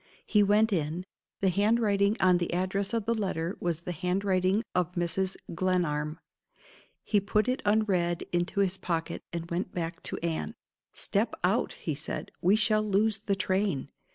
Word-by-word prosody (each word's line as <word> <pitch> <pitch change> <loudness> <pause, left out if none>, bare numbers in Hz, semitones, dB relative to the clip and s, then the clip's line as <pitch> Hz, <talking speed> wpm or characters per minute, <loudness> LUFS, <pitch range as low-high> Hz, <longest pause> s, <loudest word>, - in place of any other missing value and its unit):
He 210 - +4
went 210 +2 +4
in. 165 +1 -1 0.4
The 195 - +4
handwriting 205 +1 +2
on 180 -1 +4
the 175 - -2
address 195 +2 -1
of 230 -3 -1
the 230 - +2
letter 185 -5 -2
was 170 -2 -1
the 180 - -4
handwriting 185 +3 +1
of 180 -1 0
Mrs. 180 +2 -1 0.2
Glenarm. 165 -4 0 0.9
He 210 - +2
put 210 +3 +1
it 255 +1 0
unread 190 -5 +2
into 175 +3 +1
his 190 -1 +1
pocket, 165 -2 -2
and 170 0 -5
went 180 +2 -2
back 170 -1 -3
to - - -3
Anne. 165 -2 -2 0.4
"Step - - 0
out!" - - +2
he - - -4
said. - - -5
"We 190 +4 +5
shall 215 0 +3
lose 215 +1 +2
the 200 -1 -1
train." 190 -7 0
185 Hz, 160 wpm, -29 LUFS, 175-205 Hz, 0.9 s, We